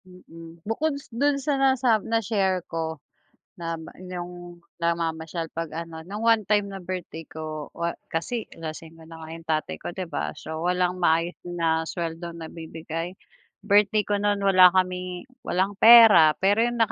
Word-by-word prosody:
Mm. 165 Hz, -2 st, -13 dB
Bukod 280 Hz, +7 st, -1 dB
s 280 Hz, -4 st, -14 dB
'don 280 Hz, +4 st, +2 dB
sa 280 Hz, 0 st, -1 dB
nasa 255 Hz, -5 st, +3 dB
na-share 200 Hz, -5 st, 0 dB
ko 160 Hz, -1 st, -4 dB, 0.6 s
na 165 Hz, -1 st, -4 dB, 0.2 s
'yong 175 Hz, -1 st, -8 dB, 0.2 s
namamasyal 165 Hz, -1 st, -2 dB
'pag 165 Hz, -1 st, -5 dB
ano, 165 Hz, -1 st, -7 dB
nung 205 Hz, +4 st, -6 dB
one 225 Hz, -2 st, +3 dB
time 205 Hz, +1 st, +1 dB
na 195 Hz, -, -7 dB
birthday 180 Hz, -3 st, -6 dB
ko, 155 Hz, -1 st, -7 dB
wa 170 Hz, 0 st, -3 dB, 0.2 s
kasi 220 Hz, +8 st, -2 dB
lasingero 160 Hz, 0 st, -9 dB
na 165 Hz, -, -10 dB
nga 160 Hz, 0 st, -2 dB
tatay -, -, -9 dB
ko, -, -, -5 dB
'di 185 Hz, +1 st, -5 dB
ba? 75 Hz, -, -3 dB
So, 160 Hz, 0 st, -6 dB
walang 180 Hz, 0 st, 0 dB
maayos 165 Hz, +1 st, +2 dB
na 165 Hz, -2 st, -1 dB
suweldong 170 Hz, 0 st, -5 dB
nabibigay. 165 Hz, +2 st, -6 dB, 0.5 s
Birthday 210 Hz, +1 st, +4 dB
ko 205 Hz, -, 0 dB
no'n 205 Hz, 0 st, +2 dB
wala 185 Hz, -2 st, +7 dB
kaming 180 Hz, 0 st, -1 dB, 0.2 s
walang 190 Hz, 0 st, 0 dB
pera, 220 Hz, -9 st, +9 dB
pero 200 Hz, +3 st, +3 dB
'yong 240 Hz, +1 st, 0 dB
175 Hz, 155 wpm, -25 LUFS, 165-205 Hz, 0.6 s, pera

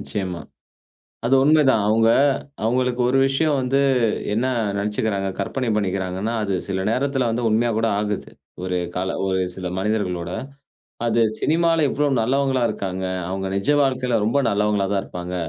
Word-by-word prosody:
நிச்சியமா 95 Hz, -4 st, -4 dB, 0.9 s
அது 130 Hz, -, +3 dB
உண்மைதான். 145 Hz, -7 st, +4 dB
அவுங்க 115 Hz, +1 st, +3 dB, 0.6 s
அவுங்களுக்கு 125 Hz, +2 st, 0 dB
ஒரு 135 Hz, +2 st, +2 dB
விஷயம் 145 Hz, +2 st, +1 dB
வந்து 130 Hz, +1 st, +1 dB, 0.5 s
என்ன 115 Hz, +5 st, +1 dB, 0.3 s
நெனைச்சுக்கிறாங்க, 100 Hz, -1 st, -1 dB
கற்பனை 130 Hz, -3 st, -2 dB
பண்ணிக்கிறாங்கன்னா 95 Hz, +1 st, -2 dB
அது 100 Hz, -2 st, -1 dB
சில 95 Hz, -1 st, -2 dB
நேரத்துல 135 Hz, +1 st, 0 dB
வந்து 115 Hz, +2 st, -1 dB
உண்மையா 115 Hz, +2 st, +2 dB
கூட 115 Hz, 0 st, +1 dB
ஆகுது. 105 Hz, -1 st, -3 dB, 0.3 s
ஒரு 90 Hz, 0 st, -1 dB, 0.2 s
காலம் 95 Hz, +1 st, -2 dB
ஒரு 95 Hz, -1 st, 0 dB
சில 95 Hz, 0 st, -6 dB
மனிதர்களோட 95 Hz, -4 st, -1 dB, 0.8 s
அது 115 Hz, 0 st, +2 dB, 0.2 s
சினிமால 165 Hz, 0 st, +2 dB
எவ்வளோ 145 Hz, +2 st, 0 dB
நல்லவங்களா 135 Hz, +2 st, +1 dB
இருக்காங்க, 95 Hz, -1 st, -4 dB, 0.3 s
அவங்க 95 Hz, 0 st, -3 dB
நிஜ 100 Hz, +7 st, -1 dB
வாழ்க்கையில 130 Hz, -3 st, 0 dB
ரொம்ப 115 Hz, +6 st, +1 dB
நல்லவங்களா 105 Hz, -1 st, +1 dB
தான் 100 Hz, -, +1 dB
இருப்பாங்க. 90 Hz, 0 st, -6 dB
110 Hz, 140 wpm, -22 LUFS, 95-130 Hz, 0.9 s, உண்மைதான்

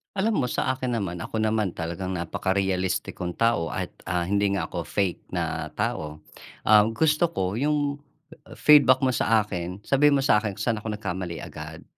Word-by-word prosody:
Alam 210 Hz, +2 st, +1 dB
mo 125 Hz, -, +1 dB
sa 130 Hz, +1 st, 0 dB
akin 130 Hz, -2 st, -2 dB
naman 90 Hz, -6 st, -3 dB
ako 110 Hz, +6 st, -3 dB
naman 110 Hz, -4 st, 0 dB
talagang 90 Hz, +3 st, -4 dB
napaka-realistik 95 Hz, +1 st, -1 dB
kong 90 Hz, -1 st, -3 dB
tao 115 Hz, -8 st, +2 dB
at, -, -, -4 dB, 0.2 s
ah, 90 Hz, -1 st, 0 dB
hindi 100 Hz, +2 st, +1 dB
nga 85 Hz, -, -1 dB
ako 85 Hz, -2 st, -5 dB
fake 95 Hz, -4 st, -2 dB
na -, -, -2 dB
tao. 75 Hz, 0 st, -3 dB, 0.4 s
Ah, 105 Hz, 0 st, +6 dB
gusto 155 Hz, +8 st, +2 dB
ko 100 Hz, -, -2 dB
yung 145 Hz, 0 st, 0 dB, 0.6 s
feedback 140 Hz, -3 st, +6 dB
mo 130 Hz, -, +3 dB
sa 115 Hz, -2 st, +2 dB
akin, 90 Hz, 0 st, -6 dB
sabihin 140 Hz, +3 st, +4 dB
mo 135 Hz, -, +1 dB
sa'kin 105 Hz, -6 st, +2 dB
kung -, -, -5 dB
saan 115 Hz, -3 st, 0 dB
ako 105 Hz, 0 st, -4 dB
nagkamali 95 Hz, -4 st, -5 dB
agad, 80 Hz, +1 st, -9 dB
105 Hz, 175 wpm, -25 LUFS, 90-130 Hz, 0.6 s, Ah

